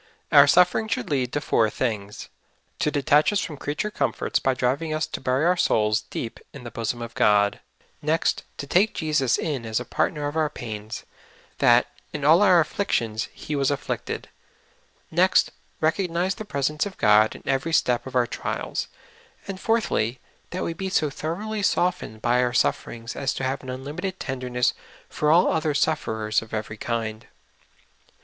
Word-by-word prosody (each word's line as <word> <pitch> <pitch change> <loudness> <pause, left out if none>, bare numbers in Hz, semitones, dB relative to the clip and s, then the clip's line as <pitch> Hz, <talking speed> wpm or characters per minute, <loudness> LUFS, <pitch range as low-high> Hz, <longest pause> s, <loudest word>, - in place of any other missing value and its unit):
Our - - +8
sufferings 180 +5 +4
should 245 -10 -4
lead 130 -3 0
to 145 - +1
four 110 -6 +2
things 105 -3 -3 0.3
— - - -42
to - - +2
detach 145 +2 +3
us 205 - +1
from 160 - -4
creature 150 +10 -3
comforts 140 -8 0
by 135 -1 +1
driving 140 +6 0
us 155 - 0
to - - -6
bur}^ 130 +3 +1
our 180 +1 +4
souls 110 -9 +2
deep 115 - -5
in 140 - -10
the 120 - -7
bosom 115 +2 -3
of 115 0 -8
God; 100 -1 +3 0.4
next, 155 +2 +1 0.2
to - - -5
take 190 +9 +2
Jesus 150 -6 +1
in 145 -7 -2
as 110 0 -1
a 125 - -6
partner 150 -1 -1
of 145 - -5
our 155 -2 +1
pains, 110 -4 -7 0.6
that 120 0 +5 0.2
" - - -37
in 145 -2 -3
all 160 +5 +6
our 185 -4 +6
afflictions 115 - -1
He 150 - -5
was 140 -1 +2
afflicted; 145 - -3 0.5
" - - -37
next, 185 0 +4 0.3
recognize 175 +3 +1
the 215 - -8
presence 150 0 -1
of 195 - -10
God 110 0 +4
in - - -12
ever}' 135 +5 0
step 125 -6 +2
of 130 - -8
our 125 -1 +4
trials; - - -3 0.6
and 195 -1 -5
fourthly, 160 - 0 0.3
that 180 - -3
we 170 - -2
be 190 +3 -4
so 155 -6 +1
thoroughly 205 +10 -4
softened 175 - 0
by 125 +1 +3
our 125 -1 0
suf 125 - +2
ferings 115 0 -8
as 135 -2 -1
to - - -4
ha\ 130 - +1
e - - -5
an 130 - -9
unlimited 150 +9 -5
tenderness 125 -2 -1 0.4
for 150 - 0
all 170 +4 +5
other 155 -2 0
sufferers 110 -9 0
of 110 0 -7
ever} 110 0 -4
kind. 110 -1 -3
140 Hz, 185 wpm, -24 LUFS, 120-165 Hz, 0.6 s, Our